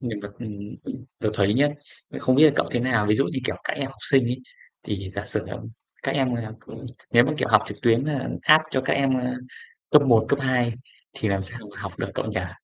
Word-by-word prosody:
Mình 115 -5 -4
còn 100 0 -8
ừm, 115 -3 -6 0.3
ừm, 130 0 -7
tớ 110 - 0
thấy 100 +1 +2
nhá 145 +3 +4 0.4
nên - - -7
không 130 - +3
biết 150 - +8
là 155 - +7
cậu - - +2
thế 120 - 0
nào. 120 -4 +2
Ví 105 - +4
dụ 135 - +3
như, 140 - -2
kiểu, - - -1
các - - -1
em 140 - -2
học 135 - -12
sinh 135 -3 +5
ấy, 125 +2 -2 0.4
thì 100 -2 -4
giả 100 +1 -5
sử, 110 - -2
ừm, 115 - -7 0.3
các - - -1
em 130 -3 +1
là 110 -2 -4
ừ - - -10 0.4
nếu 120 0 +8
mà, 145 - 0
kiểu, - - 0
học 110 -3 +6
trực 105 0 -7
tuyến, 120 +2 +4
a, 145 -3 -2
hát 155 +1 +7
cho 130 - +1
các 135 - -1
em, 135 -1 +2
ơ, 125 0 -2 0.6
cấp 150 - +7
1, 120 -5 +4
cấp 140 - +2
2 125 -2 +2 0.4
thì 110 - -2
làm 95 -1 0
sao 95 - -8
mà - - -16
học - - -5
được - - -2
cậu - - -2
nhỉ? - - -3
125 Hz, 260 wpm, -24 LUFS, 110-135 Hz, 0.6 s, biết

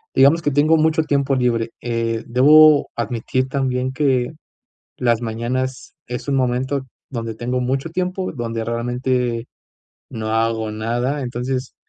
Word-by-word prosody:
digamos 140 +5 +5
que 150 - +1
tengo 150 +3 +4
mucho 160 +1 +2
tiempo 140 -2 +1
libre, 120 -3 0
eh, 115 -1 -2
debo 150 +5 +6
admitir 130 +2 -2
también 130 -1 -1
que 130 -4 +1 0.7
las 120 -2 +1
mañanas 125 +3 -3
es 125 +3 -6
un 140 - +1
momento 130 +1 0 0.2
donde 115 -3 -4
tengo 125 +3 -2
mucho 135 +5 -1
tiempo, 185 +2 -2
donde 115 -3 -3
realmente 120 0 -1 0.6
no 110 -1 -4
hago 110 -1 0
nada, 120 +6 -2
entonces 125 +1 -3
125 Hz, 130 wpm, -20 LUFS, 115-140 Hz, 0.7 s, debo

